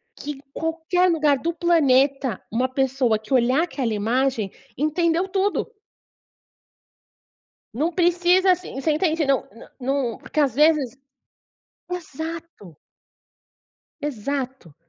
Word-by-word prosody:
que 295 - -6
em 270 - -9
qualquer 330 +3 +1
lugar 300 -4 +3
do 335 +5 -2
planeta 275 - +2
uma 250 +3 +1
pessoa 260 -4 +1
que 220 +5 -6
olhar 255 +4 +3
aquela 260 -10 -2
imagem, 225 0 0 0.3
entendeu 335 +4 +1
tudo. 400 +4 -1 2.0
Não 310 +8 0
precisa, 355 +2 +3
assim, 360 -7 -3
você 310 +3 +1
entende, 320 -1 +1
não 270 -2 +1
não 230 - -14 0.4
num - - -10
porque, 305 - -4
às 270 -5 +2
vezes 295 -5 +3 0.9
exato. 320 - -7 1.3
Exato, 265 - -4
290 Hz, 110 wpm, -23 LUFS, 255-335 Hz, 2.0 s, lugar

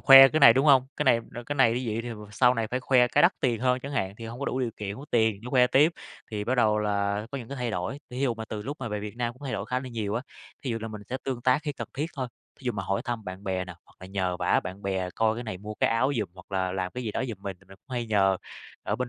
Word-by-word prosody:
khoe 135 -1 +10
cái 155 +2 0
này, 115 - +10
đúng 135 +5 +2
hông? 130 -3 +6
Cái 150 - 0
này, 120 -3 +5
ờ, 120 - -5
cái 145 - -2
này 120 -4 +5
như 125 - -1
vậy 115 - -1
thì 120 - -6 0.2
sau 125 +3 +4
này 115 -1 -1
phải 125 - -2
khoe 125 -1 +4
cái 135 - +3
đắt 175 - +6
tiền 120 -3 +1
hơn 125 0 +2
chẳng 140 +2 -6
hạn, 95 -8 -1
thì 115 - -7
hông 120 +3 -8
có 140 - -2
đủ 130 - -1
điều 120 -3 0
kiện, 100 -1 -4
hông 120 - -9
có - - -11
tiền 110 -4 +2
để - - -9
khoe 125 -2 +5
tiếp, 145 +6 +4 0.4
thì 105 -2 -3
bắt 125 +4 +1
đầu 110 -3 +3
là 100 0 0
có 140 - -4
những 115 - -9
cái 140 - -6
thay 125 -3 -2
đổi. 90 +9 -3
Thí 125 - -6
dụ 125 -4 +1
mà 110 - -6
từ 110 -1 -5
lúc 140 +7 -5
mà 120 - -3
về 105 -1 -3
Việt 105 +1 -7
Nam 120 -1 -1
cũng 130 +4 -19
thay 135 - -3
đổi 100 - -3
khá 125 +2 -1
là 130 - -7
nhiều 110 -4 -3
á, 120 - -1 0.4
thí 130 - -2
dụ 115 - -1
là 115 - -4
mình 105 -1 -8
sẽ 130 - -1
tương 130 -3 -2
tác 130 +4 +3
khi 150 -2 -2
cần - - -6
thiết 145 +4 -1
thôi, 130 -2 -2 0.3
thí - - -16
dụ 125 - 0
mà 100 -2 -3
hỏi 95 +1 -1
thăm 120 -3 -3
bạn 95 +1 -7
bè 95 -2 -1
nè, 90 -1 -9
hoặc - - -24
là 95 - -8
nhờ 95 -2 -1
vả - - +2
bạn 95 +2 -7
bè 95 -2 -1
coi 110 0 +2
cái 120 - -5
này 105 -5 -5
mua 105 +2 -7
cái - - +2
áo 125 +5 +2
giùm 105 - -1
hoặc 90 +1 -15
là 95 -1 0
làm 95 -1 -2
cái 125 - -4
gì 110 - -1
đó - - -1
giùm 115 - -4
mình 95 -2 -5
thì - - -21
mình 95 - -13
cũng 130 +7 -16
hay 120 -1 -2
nhờ 100 -3 +3 0.5
ở - - -1
bên 125 -1 -2
115 Hz, 335 wpm, -27 LUFS, 100-130 Hz, 0.5 s, khoe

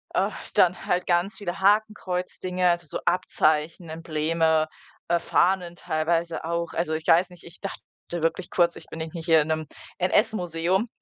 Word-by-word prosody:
ach, - - -1
dann 180 0 +3
halt 180 +1 0
ganz 175 +3 +1
viele 180 -4 -4
Hakenkreuzdinge, 185 -3 +1
also, 175 -1 0
so - - -4
Abzeichen, 160 -2 +1
Embleme, 160 0 +1 0.4
äh, 170 0 +2
Fahnen 175 0 +1
teilweise 165 +1 -1
auch. 170 0 -2
Also, 165 -1 -1
ich 160 0 -5
weiß 175 +2 +5
nicht, 175 -1 -15
ich 170 +1 -13
dachte 195 - -5 0.3
wirklich 170 +1 -1
kurz: 170 -1 +2
„Ich - - -11
bin 165 - -8
irgendwie 160 +1 -5
hier 160 -2 +5
in 150 - -2
'nem 155 -1 -1 0.3
NS-Museum.“, 185 0 +1
170 Hz, 160 wpm, -25 LUFS, 160-180 Hz, 0.4 s, weiß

